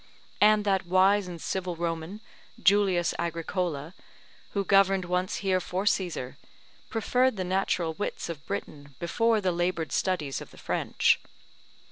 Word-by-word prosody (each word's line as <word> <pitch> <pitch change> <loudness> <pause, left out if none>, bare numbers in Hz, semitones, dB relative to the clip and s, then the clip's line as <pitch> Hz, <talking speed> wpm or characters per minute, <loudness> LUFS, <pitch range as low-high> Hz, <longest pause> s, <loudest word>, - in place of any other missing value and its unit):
And 210 0 +5
that 190 -3 +1
wise 190 +2 +4
and 175 -2 -7
civil 180 +1 -3
Roman, 165 +4 -4 0.4
Julius 195 -3 +3
Agricola, 170 -2 -2 0.6
who 200 - 0
governed 195 -1 +4
once 180 +1 -1
here 185 -1 +3
for 185 +2 -3
Caesar, 175 -10 -1 0.5
preferred 250 +2 +1
the 185 - -1
natural 180 -3 0
wits 205 - -4
of 155 -4 -7
Britain 145 -2 -6
before 225 +6 +1
the 185 -2 +1
laboured 175 -1 -1
studies 160 -8 -1
of - - -10
the - - -17
French. - - +1
185 Hz, 135 wpm, -28 LUFS, 170-195 Hz, 0.6 s, And